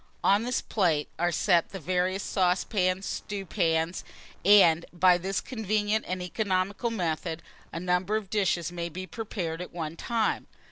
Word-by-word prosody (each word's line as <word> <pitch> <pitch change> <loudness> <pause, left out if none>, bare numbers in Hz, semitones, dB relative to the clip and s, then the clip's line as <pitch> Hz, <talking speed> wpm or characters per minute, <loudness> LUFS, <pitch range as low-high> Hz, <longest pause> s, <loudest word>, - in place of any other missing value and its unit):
On 200 +2 +4
this 245 +2 -1
plate 165 -8 +1
are 175 +1 +2
set 175 0 +2
the 195 - -7
various 185 +3 0
saucepans, 185 0 +1
stewpans, 170 -4 -1 0.4
&c. 205 +2 +8
and, 165 0 +3
by 180 0 +4
this 190 +2 -1
convenient 215 -2 -1
and 185 0 -3
economical 195 +3 -1
method, 170 -5 -2 0.3
a 165 - -4
number 180 +3 0
of 210 -3 -3
dishes 180 -5 +1
may 170 -1 -4
be 185 +3 -6
prepared 185 -6 -4
at 180 - -7
one 165 -2 -5
time. 225 +4 -1
185 Hz, 150 wpm, -28 LUFS, 170-205 Hz, 0.4 s, c